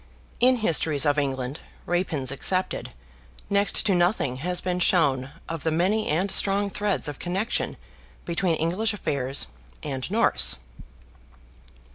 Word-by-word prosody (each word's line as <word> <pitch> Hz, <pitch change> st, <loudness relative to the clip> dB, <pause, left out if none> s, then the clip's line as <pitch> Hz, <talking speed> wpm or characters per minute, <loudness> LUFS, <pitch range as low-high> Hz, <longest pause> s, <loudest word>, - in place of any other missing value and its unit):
In 255 Hz, +1 st, +5 dB
Histories 160 Hz, -, +2 dB
of 145 Hz, 0 st, +2 dB
England 135 Hz, 0 st, -3 dB, 0.3 s
(Rapin's 160 Hz, -7 st, 0 dB
excepted) 185 Hz, +7 st, -1 dB, 0.6 s
next 200 Hz, +2 st, +2 dB
to 205 Hz, -, +3 dB
nothing 175 Hz, -7 st, +1 dB
has 180 Hz, +6 st, -1 dB
been 180 Hz, -1 st, -2 dB
shown 140 Hz, -8 st, +2 dB, 0.2 s
of 165 Hz, -2 st, -5 dB
the 160 Hz, -, 0 dB
many 185 Hz, +7 st, +1 dB
and 185 Hz, +6 st, 0 dB
strong 200 Hz, 0 st, +4 dB
threads 205 Hz, -5 st, -1 dB
of 145 Hz, -2 st, -6 dB
connection 190 Hz, +6 st, -1 dB, 0.5 s
between 170 Hz, 0 st, 0 dB
English 185 Hz, +8 st, 0 dB
affairs 135 Hz, -7 st, -1 dB, 0.4 s
and 130 Hz, +2 st, -4 dB
Norse. 225 Hz, +4 st, +3 dB
175 Hz, 125 wpm, -25 LUFS, 145-200 Hz, 0.6 s, In